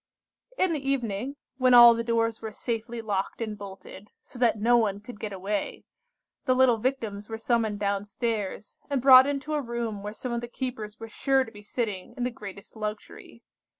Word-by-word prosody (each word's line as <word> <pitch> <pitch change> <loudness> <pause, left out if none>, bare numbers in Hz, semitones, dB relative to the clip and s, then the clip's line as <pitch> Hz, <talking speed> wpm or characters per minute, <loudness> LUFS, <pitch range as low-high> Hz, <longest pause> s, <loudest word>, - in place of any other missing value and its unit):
"In 370 -2 +2
the 305 - -1
evening, 265 -2 -2 0.2
when 255 -1 +5
all 240 -1 +10
the 230 0 -2
doors 230 -1 0
were 220 -1 -5
safely 230 +1 -4
locked 200 -3 -2
and 220 -2 -3
bolted, 200 0 -11
so 245 - -11
that 235 -3 +3
no 235 +3 +4
one 210 -4 +2
could 210 +1 -11
get 215 - -4
away, 195 +1 -3 0.6
the 255 - +3
little 255 -2 +5
Victims 220 -4 -3
were 225 - -4
summoned 225 -2 0
down 200 0 -1
stairs, 210 -2 -3
and 280 -2 +1
brought 260 +1 +8
into 285 +2 -2
a 300 - +1
room 235 -4 -4
where 205 +1 -5
some 245 +3 -6
of 235 0 -2
the 240 - -5
keepers 235 -4 -5
were 225 - -7
sure 270 +4 +1
to 225 - -11
be 205 - -12
sitting 210 -3 -4
in 245 - -2
the 250 - 0
greatest 200 -3 -10
luxury. 215 0 -7
230 Hz, 195 wpm, -27 LUFS, 210-250 Hz, 0.6 s, all